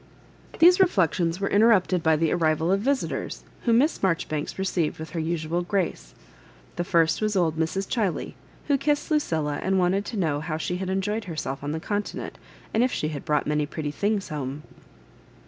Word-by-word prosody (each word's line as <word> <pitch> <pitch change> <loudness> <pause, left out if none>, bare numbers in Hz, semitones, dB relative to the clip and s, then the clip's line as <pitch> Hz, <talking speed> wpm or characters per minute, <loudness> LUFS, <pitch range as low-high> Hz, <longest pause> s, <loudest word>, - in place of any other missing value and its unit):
These 355 +3 +7
reflections 180 - +2
were 195 - 0
inter 215 +3 +4
rupted 185 -4 +3
by 160 -1 +3
the 155 0 +1
arrival 160 0 +1
of 195 - +3
visitors, 270 +5 -2 0.2
whom 230 -1 +4
Miss 295 +6 +2
Marjoribanks 165 -5 -1
received 185 -4 -1
with 160 +1 -8
her 170 - -3
ususd 165 +1 -2
grace. 180 - -2 0.6
The - - -1
first 165 -1 +2
was 215 -1 0
old 170 -4 +2
TiSie, 160 +4 -1
Chiley, 210 -8 -1 0.3
who 285 -2 +2
kiss^ 295 +3 0
Lu 305 - +5
cilla^ 155 - -1
and 190 0 +1
wanted 185 +2 +2
to 230 - -5
know 155 -6 0
how 155 0 -3
she 180 +3 -2
had 185 0 -4
enjoyed 205 +3 -1
herself 150 -5 -4
on 145 - -2
the 160 - -2
Contment, 205 +4 -4 0.3
and 220 - +3
if 255 +1 +2
she 155 - -1
had 150 -2 -6
brought 150 -2 +1
many 150 0 0
pretty 150 -1 -4
things 205 +4 -1
home. 145 -1 -4
175 Hz, 190 wpm, -25 LUFS, 155-205 Hz, 0.6 s, These